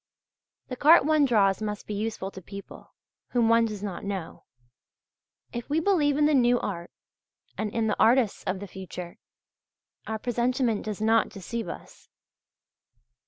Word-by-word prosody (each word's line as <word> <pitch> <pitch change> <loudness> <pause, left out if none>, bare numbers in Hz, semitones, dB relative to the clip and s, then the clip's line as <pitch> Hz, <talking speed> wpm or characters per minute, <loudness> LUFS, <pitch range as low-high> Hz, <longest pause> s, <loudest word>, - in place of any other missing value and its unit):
The 255 - -4
cart 305 +3 +6
one 305 -1 +4
draws 205 -6 +3
must 210 -1 -4
be 210 - -5
useful 205 -2 -3
to 190 - -10
people 200 +2 -11 0.4
whom 235 -2 +3
one 230 0 +5
does 210 -2 -5
not 195 -4 -5
know. 195 -4 -5 1.1
If 240 +2 -6
we 300 +3 +2
believe 310 -6 +2
in 300 - +4
the 305 - +3
new 245 -2 +4
art, 170 -4 -5 0.7
and 215 -1 -3
in 230 0 0
the 215 - -1
artists 235 -2 +3
of 185 0 -2
the 200 - -7
future, 180 -2 -8 0.9
our 220 - -2
presentiment 240 -1 0
does 210 -1 -4
not 225 +1 +3
deceive 225 +3 -5
us. - - -10
220 Hz, 155 wpm, -27 LUFS, 200-250 Hz, 1.1 s, cart